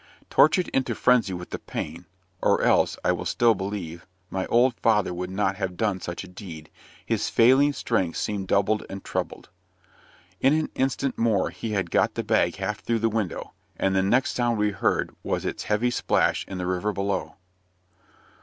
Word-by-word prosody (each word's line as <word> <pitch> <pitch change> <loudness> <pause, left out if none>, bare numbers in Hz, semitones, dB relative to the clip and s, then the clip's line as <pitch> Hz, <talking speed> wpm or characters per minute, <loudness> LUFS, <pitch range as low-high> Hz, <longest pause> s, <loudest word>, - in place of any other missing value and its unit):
Tortured 165 +5 +4
into 135 - 0
frenzy 125 -6 +3
with 90 0 -7
the - - -4
pain 85 +3 -6 0.3
or - - +2
else, - - +3
I - - +4
will - - -2
still 120 -1 +3
believe, 95 -4 -5 0.2
my 95 -1 -2
old 125 +2 +4
father 105 -5 +2
would 90 +1 -4
not 95 0 0
have 95 -3 -3
done 100 -4 0
such 85 +1 -5
a - - -10
deed 85 -4 -10 0.3
his - - 0
failing 130 +5 +5
strength 95 - -1
seemed 100 -3 -2
doubled 100 +3 +2
and 95 0 -7
trebled. - - -4 0.9
In 135 +2 +4
an 155 0 0
instant 135 +1 -1
more 110 -5 +2
he 110 -2 -5
had 95 -4 -1
got 105 +6 +2
the 115 - -2
bag 105 -6 +2
half 100 +2 -3
through 115 - -1
the 115 +1 +1
window, 105 -5 -3 0.2
and 95 0 +1
the 95 - +4
next 120 +7 +2
sound 120 -2 +1
we 105 0 +1
heard 95 - 0
was - - -2
its - - -4
heavy 110 +4 +1
splash - - +1
in 95 - -6
the 90 - -3
river 95 +3 -1
below. 100 -1 -2
105 Hz, 180 wpm, -25 LUFS, 95-115 Hz, 0.9 s, failing